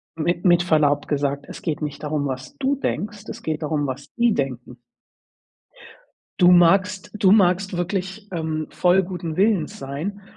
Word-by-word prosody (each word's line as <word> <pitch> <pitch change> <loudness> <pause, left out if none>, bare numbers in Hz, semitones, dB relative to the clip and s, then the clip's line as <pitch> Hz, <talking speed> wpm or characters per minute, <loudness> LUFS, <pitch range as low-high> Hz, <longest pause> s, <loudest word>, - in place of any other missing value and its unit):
mit 170 +3 -1
mit 175 -1 +5
Verlaub 150 -4 +2
gesagt, 140 -1 -1
es - - -9
geht 160 -2 -3
nicht 150 -1 -5
darum, 150 -1 -1
was 130 -1 -6
du 275 +1 0
denkst. 210 -5 -4
Es 230 +1 -8
geht 155 0 -3
darum, 150 -1 -1
was 135 +1 -6
die 235 -2 +3
denken. 125 -4 -4 1.6
Du 175 0 +6
magst 185 +2 +4
du 195 -2 +4
magst 190 -2 +3
wirklich, 190 +3 -3
ähm, 160 -2 -3
voll 180 +2 +3
guten 175 -3 -5
Willens 195 -5 +1
sein 155 +10 -5
175 Hz, 155 wpm, -22 LUFS, 150-190 Hz, 1.6 s, Du